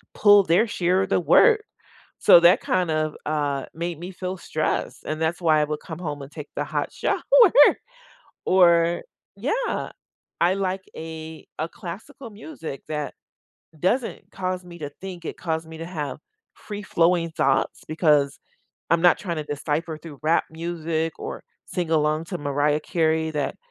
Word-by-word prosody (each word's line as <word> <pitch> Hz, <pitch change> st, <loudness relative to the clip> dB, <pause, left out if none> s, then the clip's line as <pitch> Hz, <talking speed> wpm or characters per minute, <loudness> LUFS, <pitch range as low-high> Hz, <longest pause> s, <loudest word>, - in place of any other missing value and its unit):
pull 205 Hz, -1 st, +7 dB
their 180 Hz, +5 st, +3 dB
share 185 Hz, -1 st, +1 dB
of 190 Hz, -, -5 dB
the -, -, +3 dB
work, 435 Hz, -, +5 dB, 0.6 s
so, -, -, +8 dB
that 175 Hz, +1 st, +6 dB
kind 180 Hz, -3 st, 0 dB
of, 155 Hz, -1 st, -1 dB
uh, 145 Hz, -3 st, -1 dB
made 170 Hz, -1 st, -4 dB
me 175 Hz, +2 st, -7 dB
feel 185 Hz, 0 st, -5 dB
stressed 155 Hz, -2 st, -2 dB
and 155 Hz, +1 st, -3 dB
that's 160 Hz, +3 st, -1 dB
why 160 Hz, -3 st, +4 dB
I -, -, +2 dB
would 150 Hz, 0 st, -4 dB
come 160 Hz, 0 st, -8 dB
home 150 Hz, -5 st, -4 dB
and 140 Hz, -, -11 dB
take 150 Hz, -2 st, -9 dB
the -, -, -1 dB
hot -, -, -2 dB
shower -, -, -1 dB, 1.2 s
or 170 Hz, -2 st, +4 dB, 0.3 s
Yeah, 445 Hz, -, -2 dB, 0.5 s
I 175 Hz, +2 st, +4 dB
like 190 Hz, -1 st, -2 dB
a 160 Hz, 0 st, -8 dB
a 160 Hz, -, -1 dB
classical 225 Hz, +11 st, -9 dB
music 205 Hz, -, -8 dB
that 150 Hz, -1 st, -3 dB, 0.7 s
doesn't 230 Hz, -, -1 dB
cause 185 Hz, -1 st, -3 dB
me 170 Hz, -1 st, -11 dB
to 145 Hz, -2 st, -5 dB
think, 185 Hz, -3 st, -7 dB
it -, -, -5 dB
cause 160 Hz, -2 st, -2 dB
me 160 Hz, 0 st, -9 dB
to 165 Hz, -, -5 dB
have 155 Hz, -5 st, -5 dB, 0.4 s
free-flowing 175 Hz, -5 st, 0 dB
thoughts 135 Hz, -3 st, +1 dB
because 150 Hz, -3 st, +2 dB, 0.5 s
I'm 170 Hz, 0 st, +3 dB
not 175 Hz, -2 st, +6 dB
trying 175 Hz, -4 st, -4 dB
to -, -, -2 dB
decipher 150 Hz, +2 st, -3 dB
through 155 Hz, -3 st, -11 dB
rap 160 Hz, +2 st, +3 dB
music 165 Hz, -1 st, -3 dB
or -, -, -6 dB, 0.2 s
sing 175 Hz, -3 st, -3 dB
along 155 Hz, 0 st, +1 dB
to 180 Hz, +1 st, -4 dB
Mariah 145 Hz, +1 st, +1 dB
Carey 160 Hz, -1 st, 0 dB
that 145 Hz, -2 st, -2 dB
165 Hz, 160 wpm, -24 LUFS, 155-180 Hz, 1.2 s, so